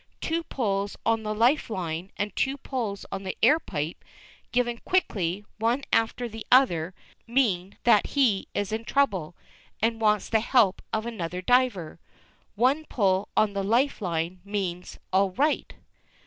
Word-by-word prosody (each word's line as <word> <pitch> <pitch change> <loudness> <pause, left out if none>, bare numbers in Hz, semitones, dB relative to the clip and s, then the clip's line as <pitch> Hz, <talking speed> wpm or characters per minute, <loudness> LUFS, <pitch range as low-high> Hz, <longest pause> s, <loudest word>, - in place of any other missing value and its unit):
Two 330 +1 -1
pulls 205 -10 -2
on 225 -1 +2
the 215 0 -3
life 245 +6 +3
line, 180 -3 -4
and 205 -2 -3
two 270 +1 0
pulls 230 -8 -4
on - - -4
the 190 -1 -5
air 295 +8 +6
pipe, 155 - -5 0.5
given 240 -1 0
quickly 200 - 0
one 235 +5 +1
after 225 +2 +1
the 225 -1 -8
other, 185 -10 +4 0.3
mean 205 -7 0
that 230 -4 +5
he 245 -9 +2
is 205 0 -1
in 220 +1 -2
trouble, 200 - 0 0.4
and 225 +1 0
wants 210 -2 +2
the 220 - +2
help 220 -4 +3
of 220 +1 -1
another 180 -7 -4
diver. 240 -10 +1 0.6
One 260 +8 +2
pull 195 -6 +1
on 210 -2 +3
the 200 -1 -1
life 240 +6 +1
line 175 0 -2
means 190 -3 -4 0.2
"all 190 0 +3
right." 295 +8 +1
215 Hz, 150 wpm, -26 LUFS, 190-245 Hz, 0.6 s, air